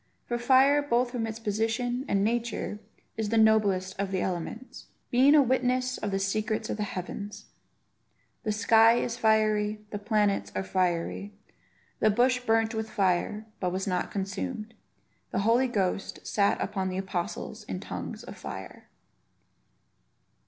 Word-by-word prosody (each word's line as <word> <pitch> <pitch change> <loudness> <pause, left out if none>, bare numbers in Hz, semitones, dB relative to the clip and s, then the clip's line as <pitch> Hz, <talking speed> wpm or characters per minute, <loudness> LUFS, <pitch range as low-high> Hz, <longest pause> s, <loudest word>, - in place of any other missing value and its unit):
For 240 0 -2
fire, 270 +4 +5
both 245 -3 +1
from 235 -3 -2
its 220 0 -5
position 230 +4 -1
and 195 0 +1
nature, 230 -1 -1 0.4
is 220 -2 -1
the 225 - +1
noblest 205 -4 +3
of 200 -1 -1
the 190 -1 -1
elements, 185 +8 -5 0.2
being 265 +4 +6
a 295 - +7
witness 255 0 +1
of 210 - -2
the 195 - 0
secrets 215 +2 -1
of - - -3
the - - -3
heavens. 205 +1 -5 1.0
The 215 - -1
sky 225 +1 +5
is 240 -1 -1
fiery; 215 -1 +2
the 205 - -4
planets 210 -1 +1
are - - -1
fiery; 185 +2 -1 0.6
the - - +4
bush 250 +4 +3
burnt 225 -1 +1
with 220 0 -3
fire, 200 +2 0
but 180 -1 -1
was 190 +1 -2
not 180 -2 -1
consumed; 215 +3 -4 0.6
the 195 - -1
Holy 240 +3 +4
Ghost 195 -4 -2
sat 200 -1 +2
upon 190 -1 -2
the 185 - -4
apostles 190 -2 -4
in - - -4
tongues - - -6
of - - -9
fire. - - -9
215 Hz, 150 wpm, -28 LUFS, 195-240 Hz, 1.0 s, a